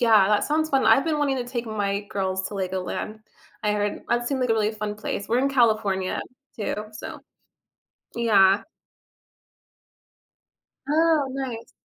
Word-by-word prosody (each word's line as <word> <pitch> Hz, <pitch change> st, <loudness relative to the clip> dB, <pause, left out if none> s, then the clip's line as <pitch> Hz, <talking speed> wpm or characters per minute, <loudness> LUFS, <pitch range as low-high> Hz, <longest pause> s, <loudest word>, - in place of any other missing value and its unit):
yeah, 220 Hz, -5 st, +5 dB
that 210 Hz, -1 st, +3 dB
sounds 310 Hz, +1 st, +1 dB
fun, 270 Hz, -1 st, +3 dB
I've 225 Hz, +5 st, +6 dB
been 310 Hz, -2 st, 0 dB
wanting 280 Hz, -2 st, +1 dB
to 245 Hz, -, -2 dB
take 240 Hz, -1 st, -4 dB
my 205 Hz, -2 st, -1 dB
girls 190 Hz, -1 st, -1 dB
to 205 Hz, -, -8 dB
LEGOLAND. 190 Hz, +3 st, -3 dB, 0.5 s
I 210 Hz, -, +2 dB
heard 205 Hz, 0 st, -2 dB
that 240 Hz, 0 st, +1 dB
seemed 270 Hz, -2 st, -1 dB
like 250 Hz, -, 0 dB
a -, -, +6 dB
really 215 Hz, -1 st, +1 dB
fun 210 Hz, -1 st, -4 dB
place. 210 Hz, -1 st, -4 dB
We're 235 Hz, -, +2 dB
in 275 Hz, -, +2 dB
California 215 Hz, -7 st, +1 dB, 0.4 s
too, 210 Hz, -, -2 dB, 0.2 s
so 215 Hz, -, -8 dB, 1.0 s
yeah. 200 Hz, -4 st, +4 dB, 2.3 s
Oh, 315 Hz, -2 st, +3 dB
nice. 260 Hz, -4 st, -5 dB
220 Hz, 150 wpm, -24 LUFS, 205-260 Hz, 2.3 s, I've